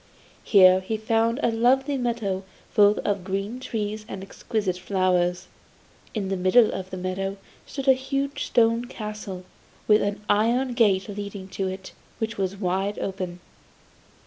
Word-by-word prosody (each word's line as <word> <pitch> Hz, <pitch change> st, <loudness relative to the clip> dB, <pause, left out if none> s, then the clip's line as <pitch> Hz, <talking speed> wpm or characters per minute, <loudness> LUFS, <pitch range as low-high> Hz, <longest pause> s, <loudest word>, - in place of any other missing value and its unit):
Here 185 Hz, -2 st, +7 dB
he 200 Hz, +4 st, -3 dB
found 225 Hz, +3 st, +1 dB
a 235 Hz, -, +3 dB
lovely 265 Hz, +5 st, +2 dB
meadow 230 Hz, -7 st, -1 dB, 0.3 s
full 205 Hz, 0 st, +5 dB
of 200 Hz, -3 st, 0 dB
green 195 Hz, +6 st, -3 dB
trees 215 Hz, -3 st, -3 dB
and 195 Hz, -, -6 dB
exquisite 195 Hz, -2 st, -3 dB
flowers. 180 Hz, -1 st, +1 dB, 0.7 s
In 200 Hz, -3 st, -2 dB
the 195 Hz, -, 0 dB
middle 190 Hz, +5 st, +4 dB
of 190 Hz, -1 st, -5 dB
the 185 Hz, -, -6 dB
meadow 190 Hz, +2 st, -3 dB, 0.3 s
stood 275 Hz, -1 st, -6 dB
a 265 Hz, -, +8 dB
huge 275 Hz, +2 st, -2 dB
stone 230 Hz, 0 st, +3 dB
castle, 210 Hz, -6 st, -7 dB, 0.4 s
with 210 Hz, 0 st, +5 dB
an 205 Hz, 0 st, -2 dB
iron 240 Hz, +5 st, +2 dB
gate 200 Hz, -5 st, +3 dB
leading 200 Hz, -1 st, -6 dB
to 190 Hz, 0 st, -2 dB
it, 190 Hz, 0 st, -6 dB, 0.3 s
which 225 Hz, -1 st, -3 dB
was 195 Hz, 0 st, -2 dB
wide 195 Hz, +1 st, -1 dB
open. 185 Hz, -2 st, -4 dB
205 Hz, 145 wpm, -25 LUFS, 190-230 Hz, 0.7 s, a